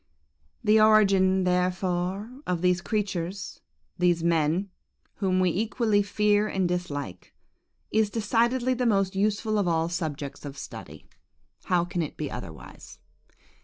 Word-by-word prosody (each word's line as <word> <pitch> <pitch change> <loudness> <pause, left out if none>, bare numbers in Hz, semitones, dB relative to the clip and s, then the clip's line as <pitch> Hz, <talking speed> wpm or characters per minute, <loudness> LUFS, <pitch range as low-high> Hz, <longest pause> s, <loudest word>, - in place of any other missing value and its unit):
"The 215 0 +5
origin, 195 -3 +4
therefore, 185 +5 -1
of 180 -1 -1
these 180 0 +2
creatures,–these 180 - -3
men,–whom 180 +3 -1
we 185 -1 +3
equally 215 +2 +1
fear 210 +1 +2
and 190 -3 0
dislike, 145 - -5 0.6
is 220 -1 +2
decidedly 235 +4 +1
the 250 -1 0
most 195 -3 +1
useful 210 +2 0
of 195 - 0
all 165 -1 +1
subjects 155 -5 -4
of 140 -1 -8
study. - - -9 0.6
How 175 -1 +2
can 175 0 -3
it 155 - -5
be 150 -2 -4
otherwise? 85 -10 -10
185 Hz, 120 wpm, -26 LUFS, 175-210 Hz, 0.6 s, The